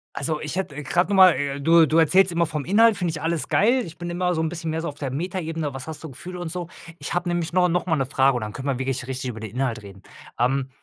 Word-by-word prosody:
Also, 150 Hz, +2 st, -2 dB
ich 155 Hz, -, -4 dB
hätte, 185 Hz, -7 st, -3 dB
äh, 150 Hz, -, -6 dB
grad 175 Hz, +6 st, +1 dB
noch 200 Hz, -, +1 dB
mal, 185 Hz, -1 st, +8 dB
äh 140 Hz, +1 st, -3 dB
du 165 Hz, +2 st, +6 dB
du 155 Hz, -, +1 dB
erzählst 185 Hz, +4 st, +4 dB
immer 170 Hz, 0 st, +1 dB
vom 150 Hz, -3 st, -4 dB
Inhalt, 220 Hz, +4 st, +4 dB
finde 175 Hz, -3 st, -1 dB
ich 155 Hz, -1 st, -6 dB
alles 165 Hz, 0 st, -1 dB
geil. 240 Hz, +5 st, +3 dB
Ich 165 Hz, -1 st, -11 dB
bin 175 Hz, +1 st, -5 dB
immer 180 Hz, +1 st, 0 dB
so 160 Hz, -, -1 dB
'n 160 Hz, -, 0 dB
bisschen 165 Hz, -1 st, -4 dB
mehr 160 Hz, +1 st, -2 dB
so 170 Hz, -, -4 dB
auf 145 Hz, -, -6 dB
der 140 Hz, -3 st, -4 dB
Metaebene, 165 Hz, -1 st, -3 dB
was 135 Hz, +1 st, -7 dB
hast 160 Hz, -1 st, -7 dB
du 160 Hz, -, -6 dB
Gefühle 180 Hz, +7 st, -8 dB
und 175 Hz, -2 st, -4 dB
so. 175 Hz, -1 st, -4 dB, 0.3 s
Ich -, -, -5 dB
habe 175 Hz, 0 st, -1 dB
nämlich 175 Hz, -1 st, -2 dB
nor 180 Hz, 0 st, +3 dB
noch 180 Hz, +1 st, 0 dB
mal 165 Hz, -3 st, +1 dB
'ne 135 Hz, -3 st, 0 dB
Frage 135 Hz, +1 st, +2 dB
und -, -, -4 dB
dann 105 Hz, -1 st, -5 dB
können 135 Hz, +4 st, -6 dB
wir 135 Hz, -3 st, -1 dB
wirklich 130 Hz, -1 st, -2 dB
richtig 130 Hz, -1 st, -4 dB
über 110 Hz, -2 st, -7 dB
den 110 Hz, -2 st, -7 dB
Inhalt 125 Hz, -1 st, -2 dB
reden. 100 Hz, -1 st, -12 dB, 0.4 s
Ähm, 130 Hz, +2 st, +1 dB
160 Hz, 300 wpm, -23 LUFS, 135-175 Hz, 0.4 s, mal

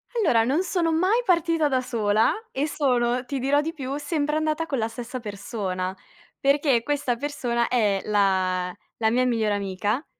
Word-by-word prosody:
Allora, 235 Hz, -, +3 dB
non 280 Hz, +9 st, +1 dB
sono 350 Hz, -3 st, 0 dB
mai 375 Hz, +9 st, +2 dB
partita 335 Hz, -4 st, +2 dB
da 260 Hz, -2 st, +2 dB
sola 220 Hz, -3 st, +1 dB, 0.2 s
e 280 Hz, +3 st, -1 dB
sono, 250 Hz, -4 st, +1 dB
ti 270 Hz, +2 st, -3 dB
dirò 280 Hz, +3 st, +2 dB
di 325 Hz, +2 st, -3 dB
più, 275 Hz, -3 st, -4 dB
sempre 295 Hz, 0 st, -1 dB
andata 310 Hz, +1 st, 0 dB
con 275 Hz, -5 st, -2 dB
la 220 Hz, 0 st, -1 dB
stessa 245 Hz, +2 st, -6 dB
persona, 200 Hz, -4 st, -4 dB, 0.4 s
perché 275 Hz, -4 st, +2 dB
questa 290 Hz, -4 st, 0 dB
persona 240 Hz, -4 st, -1 dB
è 210 Hz, -5 st, +2 dB
la 185 Hz, -3 st, +1 dB, 0.2 s
la 220 Hz, -1 st, +2 dB
mia 250 Hz, +2 st, +2 dB
migliore 220 Hz, -4 st, +1 dB
amica, 205 Hz, -, -2 dB
250 Hz, 165 wpm, -25 LUFS, 215-295 Hz, 0.4 s, Allora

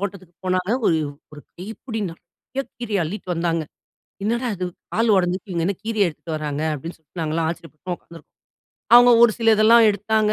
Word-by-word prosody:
தோட்டத்துக்கு 190 Hz, -3 st, -6 dB
போனாங்க. 185 Hz, +2 st, 0 dB, 0.2 s
ஒரு, 160 Hz, -, +3 dB, 0.3 s
ஒரு 150 Hz, -, -10 dB, 0.2 s
கைப்புடி 220 Hz, +4 st, -6 dB
நெறைய 180 Hz, +10 st, -8 dB
கீரைய 215 Hz, -6 st, -1 dB
அள்ளிட்டு 185 Hz, +2 st, -6 dB
வந்தாங்க. 165 Hz, -1 st, 0 dB, 0.6 s
என்னடா 235 Hz, +3 st, 0 dB
இது 185 Hz, -, -2 dB, 0.3 s
கால் 225 Hz, +1 st, +2 dB
உடஞ்சுருக்கு, 185 Hz, +1 st, 0 dB
இவங்க 170 Hz, -1 st, 0 dB
என்ன 200 Hz, -, -1 dB
கீரைய 220 Hz, -4 st, +1 dB
எடுத்துட்டு 160 Hz, +1 st, -7 dB
வராங்க? 150 Hz, -1 st, -3 dB
அப்படின்னு 165 Hz, +5 st, -8 dB
சொல்ட்டு, 160 Hz, +3 st, -12 dB
நாங்கலாம் 160 Hz, +1 st, 0 dB
ஆச்சரியப்பட்டு 170 Hz, +1 st, -6 dB
உக்காந்துருக்கோம். 165 Hz, -2 st, -16 dB, 0.6 s
அவுங்க 245 Hz, 0 st, +9 dB
ஒரு 225 Hz, -, +4 dB
சில 225 Hz, -1 st, +4 dB
இதெல்லாம் 225 Hz, +2 st, +6 dB
எடுத்தாங்க. 215 Hz, +1 st, +1 dB
185 Hz, 165 wpm, -22 LUFS, 165-220 Hz, 0.6 s, அவுங்க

